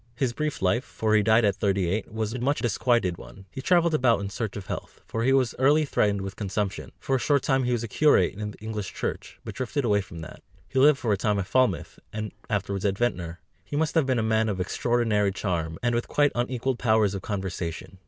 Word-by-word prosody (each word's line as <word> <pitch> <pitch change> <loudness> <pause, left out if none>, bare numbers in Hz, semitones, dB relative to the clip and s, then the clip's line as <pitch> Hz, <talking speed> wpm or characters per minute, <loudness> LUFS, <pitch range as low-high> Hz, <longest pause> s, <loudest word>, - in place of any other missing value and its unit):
His 120 -1 0
brief 150 -4 -3
life, 95 +8 +2
for 110 -5 -1
he 110 - +5
died 110 +2 +4
at 100 - +1
thirty 100 -3 +1
eight, 100 +4 -2
was 110 0 -2
a 125 - -4
much 140 +4 +1
disquieted 115 -5 +1
one; 95 -1 -12
he 130 - -6
travelled 170 +2 +3
about 125 -6 +3
in 100 0 -4
search 105 0 -4
of 100 - -7
health, - - -6
for 115 - -3
he 130 - +3
was 130 -3 +3
early 145 +4 +4
threatened 100 -7 +1
with 95 0 -6
consumption; 100 -1 -3
for 135 - 0
a - - -4
short 140 +1 +2
time 135 -2 +2
he 125 - 0
was 120 -2 0
a - - -3
curate 115 - +3
in 105 +1 -5
the 105 - -11
English 105 -3 -5
Church, - - -4
but - - -6
drifted 130 +2 -2
away 105 -2 +3
from 85 -3 -10
that. 80 - -10 0.3
He 135 - -1
lived 145 +1 +6
for 115 -6 0
a - - 0
time 105 +1 0
at 95 - -1
Falmouth, 115 -8 0
and 105 -1 -4 0.2
afterwards 100 -2 -2
at 100 -2 +1
Ventnor. 90 -8 -2 0.2
He - - -6
must 160 +2 +1
have 160 -5 +2
been 130 -2 +2
a 110 - +1
man 110 0 +2
of 95 -3 -2
extraordinary 105 +1 +1
charm, 85 -5 -2
and 120 -1 +2
with 120 0 -1
quite 145 -1 +2
unequalled 125 +1 -1
powers 110 -4 +3
of 100 - -4
conversation. 95 -3 -5
110 Hz, 240 wpm, -26 LUFS, 100-130 Hz, 0.3 s, lived